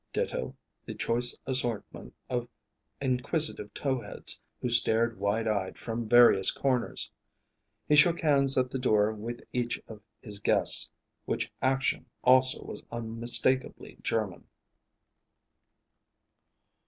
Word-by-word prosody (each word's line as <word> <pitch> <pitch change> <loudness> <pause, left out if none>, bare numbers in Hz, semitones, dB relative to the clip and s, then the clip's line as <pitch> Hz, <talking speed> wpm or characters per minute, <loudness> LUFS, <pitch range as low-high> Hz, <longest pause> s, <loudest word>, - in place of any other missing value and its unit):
Ditto 65 - -3 0.3
the - - -8
choice 120 +1 0
assortment 125 -5 -4
of 120 -1 -2 0.5
inquisitive 130 -2 -1
tow 130 -3 -1
heads, - - -3 0.2
who - - -2
stared 115 -1 +3
wide 105 +3 0
eyed 100 -3 -2
from 115 -1 -5
various 120 -5 +6
corners. 130 -3 -1 0.8
He 150 - +4
shook 165 +3 +5
hands 140 -3 +3
at 130 0 +1
the 135 - -3
door 110 -4 +2
with 115 +3 -7
each 120 -1 -1
of 110 -2 -11 0.2
his 105 -3 -6
guests, - - +4 0.4
which - - -2
action 135 +1 0 0.2
also 130 +1 +4
was - - -8
unmistakably 120 +3 -1
German. 105 -6 -2
120 Hz, 115 wpm, -29 LUFS, 110-130 Hz, 0.8 s, various